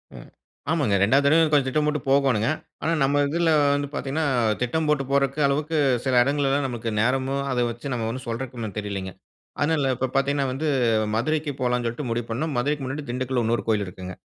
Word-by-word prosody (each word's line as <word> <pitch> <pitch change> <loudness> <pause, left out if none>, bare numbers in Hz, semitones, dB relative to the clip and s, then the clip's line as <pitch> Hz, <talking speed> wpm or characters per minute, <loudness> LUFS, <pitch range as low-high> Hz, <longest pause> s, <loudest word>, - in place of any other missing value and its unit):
ம் - - -11 0.4
ஆமாங்க 140 -11 +1
2வது 135 +8 +4
தடவையும் 160 +2 +4
கொஞ்சம் 145 -3 +3
திட்டம் 150 +3 +1
போட்டு 150 0 0
போகோணுங்க. 135 -6 +3 0.4
ஆனா 160 - +1
நம்ம 140 +1 +2
இதில 165 +2 +1 0.2
வந்து 145 0 -2
பாத்தீங்கன்னா, 145 +4 -2 0.4
திட்டம் 150 +6 0
போட்டு 150 -2 +2
போறக்கு 140 +1 +1
அளவுக்கு 150 +3 -1 0.3
சில 130 - +1
இடங்கள்லலாம் 140 0 +1
நமக்கு 120 -2 -4
நேரமும், 130 +4 +1
அத 125 - 0
வச்சு 120 +4 -6
நம்ம 115 -2 -2
ஒண்ணும் 130 +2 -6
சொல்றக்கு 120 +2 -5
ஒண்ணும் 110 -4 -5
தெரியலைங்க. 100 -2 -4 0.5
அதனால 145 -2 +1
இப்போ 130 - -1
பாத்தீங்கன்னா 140 +1 +1
வந்து, 140 +5 -2 0.5
மதுரைக்கு 150 +5 0
போலான்சொல்ட்டு 125 +1 -1
முடிவு 115 0 -2
பண்னோம். 150 +6 -2
மதுரைக்கு 145 +3 0
முன்னாடி 140 +3 -5
திண்டுக்கல்ல 125 -1 -1
இன்னொரு 115 +1 0
கோயில் 105 -2 +1
இருக்குங்க. 90 0 -8
135 Hz, 175 wpm, -24 LUFS, 120-145 Hz, 0.5 s, 2வது